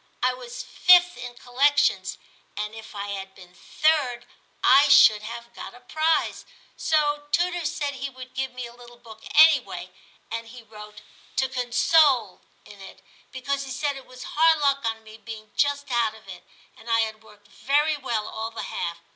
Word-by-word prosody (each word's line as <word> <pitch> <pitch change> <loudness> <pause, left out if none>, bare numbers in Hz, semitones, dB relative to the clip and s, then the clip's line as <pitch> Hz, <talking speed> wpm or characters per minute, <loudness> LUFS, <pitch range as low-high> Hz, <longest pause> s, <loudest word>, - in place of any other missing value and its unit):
I 255 0 +3
was 250 -1 -8
5th 355 0 +5
in 245 0 -8
collec 270 +4 +1
tions, - - +1 0.4
and 210 +1 -4
if 220 -1 -11
I 200 0 -5
had 195 -1 -6
been 180 -1 -16
3d 270 - 0 0.4
I 275 +2 +6
should 220 -7 +7
have 235 +2 -9
got - - -9
a - - -14
prize; 315 +5 0 0.3
so 295 -2 0
tutor 350 0 0
said 290 -3 -3
he 275 +1 -5
would 255 -1 -12
give 265 0 -3
me 250 -1 -7
a 235 - -11
little 240 0 -15
book 225 -2 -15
anyway, 315 +1 +4 0.4
and 230 0 -5
he 240 +1 -12
wrote 210 -1 -13 0.3
to 265 - +1
con 250 -2 -4
sole 255 - +3
" - - -37
in 200 -1 -15
it, 195 - -13 0.3
because 275 +1 -3
he 265 - -8
said 285 +3 -2
it 270 - -11
was 255 0 -11
hard 320 +1 +3
luck 280 -2 +1
on 225 0 -3
me 220 0 -13
being 220 -2 -10
just 285 -1 0
out 235 -2 +1
of 220 -3 -18
it, 185 -2 -10 0.3
and 235 - -13
I 230 0 +3
had 220 -1 -4
worked 210 -1 -20
very 290 +8 0
well 235 -7 -3
all 225 +1 -5
the 230 - -7
half. 170 0 -4
245 Hz, 190 wpm, -24 LUFS, 220-285 Hz, 0.4 s, should